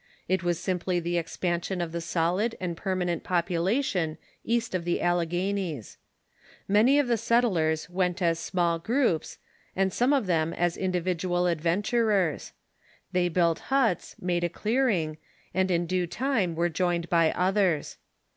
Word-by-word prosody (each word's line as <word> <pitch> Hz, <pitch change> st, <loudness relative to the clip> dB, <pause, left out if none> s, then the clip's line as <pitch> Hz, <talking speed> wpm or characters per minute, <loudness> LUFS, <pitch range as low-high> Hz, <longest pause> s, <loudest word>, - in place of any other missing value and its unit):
It 190 Hz, +1 st, +1 dB
was 175 Hz, -2 st, 0 dB
simply 180 Hz, -1 st, -1 dB
the 175 Hz, 0 st, -1 dB
expansion 175 Hz, +2 st, -2 dB
of 170 Hz, -2 st, -2 dB
the 170 Hz, 0 st, -3 dB
solid 175 Hz, +7 st, 0 dB
and 175 Hz, -2 st, -3 dB
permanent 180 Hz, -2 st, -2 dB
population 175 Hz, -, 0 dB, 0.3 s
east 235 Hz, -1 st, -1 dB
of 185 Hz, -2 st, -1 dB
the 175 Hz, 0 st, 0 dB
Alle 175 Hz, -1 st, +1 dB
^^^Cun^T"^ -, -, -14 dB, 0.3 s
ghanies. 165 Hz, -, -5 dB, 0.7 s
Many 220 Hz, +8 st, +4 dB
of 290 Hz, -3 st, +2 dB
the 235 Hz, -1 st, +2 dB
settlers 180 Hz, -11 st, +2 dB
Avent 180 Hz, 0 st, -1 dB
as 165 Hz, -2 st, +1 dB
small 170 Hz, -1 st, 0 dB
groups, 225 Hz, -, 0 dB, 0.4 s
and 190 Hz, -1 st, +1 dB
some 245 Hz, +3 st, +2 dB
of 275 Hz, -6 st, +2 dB
them 165 Hz, -2 st, +1 dB
as 175 Hz, -1 st, 0 dB
individual 180 Hz, -1 st, -1 dB
adven 170 Hz, +2 st, +1 dB
turers. 210 Hz, -8 st, +1 dB, 0.6 s
They 180 Hz, -1 st, +1 dB
built 170 Hz, -1 st, +2 dB
huts, 265 Hz, -9 st, +1 dB
made 175 Hz, -1 st, -1 dB
a 175 Hz, -, +1 dB
clearing, 205 Hz, -7 st, 0 dB, 0.3 s
and 190 Hz, +1 st, +1 dB
in 175 Hz, -1 st, +1 dB
due 180 Hz, 0 st, -1 dB
time 210 Hz, -4 st, 0 dB
were 170 Hz, +1 st, +1 dB
joined 175 Hz, 0 st, -1 dB
by 165 Hz, -2 st, +3 dB
others. 185 Hz, -4 st, +1 dB
180 Hz, 155 wpm, -27 LUFS, 170-195 Hz, 0.7 s, Many